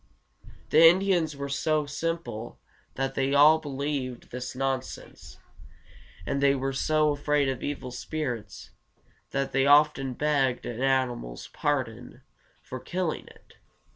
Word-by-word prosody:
The 160 - +6
Indians 175 -3 +3
were 140 0 -4
so 150 +2 0
simple 150 -6 -4 0.4
that 135 0 -2
they 135 0 0
believed 140 -3 +2
all - - -24
this 125 0 -6
nonsense, 135 0 -4 0.9
and 140 +7 -1
they 140 0 +4
were 135 0 -2
so 155 +2 +2
afraid 145 0 +1
of 135 -2 -2
evil 140 -3 -4
spirits 120 - -5 0.6
that 135 0 -2
they 135 +1 +2
often 145 -3 +4
begged 140 -4 +1
an 120 0 -5
animal's 130 - -1
pardon - - -3 0.4
for 130 - -7
killing 175 +3 -3
it. - - -19
140 Hz, 125 wpm, -27 LUFS, 130-150 Hz, 0.9 s, The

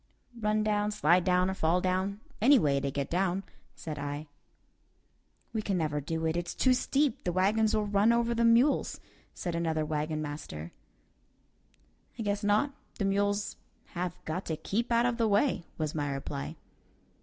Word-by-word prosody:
"Run 215 0 +1
down, 210 -1 +1
slide 185 -4 +3
down, 180 0 +3
or 190 - -1
fall 170 -1 +2
down; 185 +3 -1 0.2
any 275 +5 +7
way 140 - +2
to 140 0 -2
get 140 0 -2
down," 185 +2 0 0.3
said 155 -3 -6
I. 145 +1 -5 1.2
"We 220 - 0
can 195 -3 -1
never 150 -3 -1
do 160 +3 -3
it; 160 0 0
it's 175 0 -3
too 260 - +4
steep; 275 0 +1
the 175 - 0
wagons 210 +5 +2
will 215 -1 +1
run 205 +2 +3
over 235 0 +2
the 235 0 +1
mules," 235 +5 +3 0.4
said 175 - -3
another 160 -2 0
wagon 155 0 -2
master. 145 - -6 1.5
"I 225 - -3
guess 205 0 -1
not; 210 +8 +2 0.2
the 200 - 0
mules 205 +1 0 0.3
have 180 -1 -4
got 180 +5 -3
to 160 - -2
keep 230 +9 -2
out 235 +1 +4
of 245 -1 +1
the 230 -2 +2
way," 205 -3 +2
was 155 -2 -2
my 145 -2 -1
reply. 75 - -4
190 Hz, 170 wpm, -30 LUFS, 160-215 Hz, 1.5 s, any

